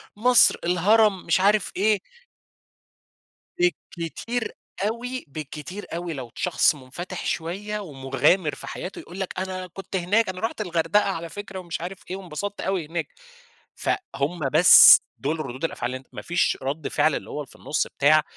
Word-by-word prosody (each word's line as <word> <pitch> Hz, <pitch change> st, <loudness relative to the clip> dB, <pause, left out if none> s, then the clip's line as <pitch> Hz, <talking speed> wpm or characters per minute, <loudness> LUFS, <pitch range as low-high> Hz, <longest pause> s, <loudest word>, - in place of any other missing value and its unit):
مصر، 245 Hz, +3 st, +5 dB
الهرم 195 Hz, +3 st, +3 dB
مش -, -, +2 dB
عارف 205 Hz, 0 st, +3 dB
إيه. 210 Hz, 0 st, +3 dB, 2.0 s
بالكتير 225 Hz, +8 st, -3 dB, 0.4 s
أوي 245 Hz, +2 st, -4 dB
بالكتير 155 Hz, +7 st, -7 dB
أوي 170 Hz, -1 st, -3 dB
لو 125 Hz, -5 st, -7 dB
شخص 175 Hz, -3 st, +2 dB
مُنفَتِح 170 Hz, +8 st, -7 dB
شوية 200 Hz, +6 st, -3 dB
ومُغامر 145 Hz, +1 st, +1 dB
في -, -, -10 dB
حياته، 185 Hz, -, -6 dB
يقول 180 Hz, +3 st, -10 dB
لك 190 Hz, -1 st, -4 dB
أنا 185 Hz, -1 st, -4 dB
كنت 190 Hz, +2 st, -8 dB
هناك، 190 Hz, +4 st, +2 dB
أنا 185 Hz, -, -5 dB
رُحت 225 Hz, -1 st, -2 dB
الغردقة 180 Hz, +2 st, +1 dB
على 170 Hz, -3 st, -4 dB
فكرة 195 Hz, -1 st, -7 dB
ومش 170 Hz, -2 st, -5 dB
عارف 180 Hz, +2 st, -5 dB
إيه، 185 Hz, -, -3 dB
وانبسطت 195 Hz, +2 st, -5 dB
أوي 190 Hz, -4 st, -1 dB
هناك. 165 Hz, +1 st, -3 dB, 0.7 s
فهُم 175 Hz, -, -2 dB
بس 170 Hz, +4 st, +10 dB, 0.2 s
دُول 155 Hz, +4 st, -2 dB
ردود 135 Hz, -1 st, -6 dB
الأفعال 120 Hz, -6 st, -3 dB
اللي 130 Hz, -, -3 dB
أنت 130 Hz, -, -22 dB
ما -, -, -6 dB
فيش 175 Hz, -1 st, +1 dB
رَد 140 Hz, +4 st, -3 dB
فعل 150 Hz, 0 st, +2 dB
اللي -, -, -6 dB
هو -, -, -5 dB
اللي 140 Hz, -, -8 dB
في -, -, -18 dB
النُص 150 Hz, -, -1 dB
بتاع، 155 Hz, +2 st, +4 dB
180 Hz, 160 wpm, -24 LUFS, 155-200 Hz, 2.0 s, بس